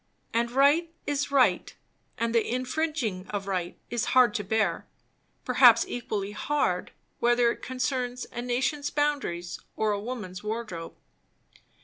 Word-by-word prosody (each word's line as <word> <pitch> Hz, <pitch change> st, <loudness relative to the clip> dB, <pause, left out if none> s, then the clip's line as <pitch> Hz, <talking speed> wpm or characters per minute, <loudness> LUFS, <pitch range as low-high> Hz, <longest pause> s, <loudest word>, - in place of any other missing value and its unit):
And 235 Hz, +1 st, +1 dB
right 285 Hz, +6 st, +3 dB
is 290 Hz, 0 st, -1 dB
right; 275 Hz, -2 st, +2 dB, 0.4 s
and 230 Hz, 0 st, -1 dB
the 230 Hz, -, +4 dB
infringing 255 Hz, -, -2 dB
of 205 Hz, -2 st, -4 dB
right 185 Hz, -3 st, -3 dB
is 240 Hz, -2 st, 0 dB
hard 245 Hz, -4 st, +6 dB
to 210 Hz, -, -2 dB
bear, 205 Hz, -3 st, 0 dB, 0.6 s
perhaps 245 Hz, -2 st, +6 dB
equally 210 Hz, -4 st, -3 dB
hard, 210 Hz, -6 st, -1 dB, 0.3 s
whether 240 Hz, 0 st, +4 dB
it -, -, -8 dB
concerns 255 Hz, -1 st, -2 dB
a 240 Hz, -, -4 dB
nation's 260 Hz, +4 st, -1 dB
boundaries 285 Hz, -14 st, -1 dB, 0.2 s
or 215 Hz, -1 st, +1 dB
a 205 Hz, -, -1 dB
woman's 210 Hz, -6 st, -6 dB
wardrobe. 210 Hz, -6 st, -5 dB
240 Hz, 130 wpm, -27 LUFS, 210-260 Hz, 0.6 s, hard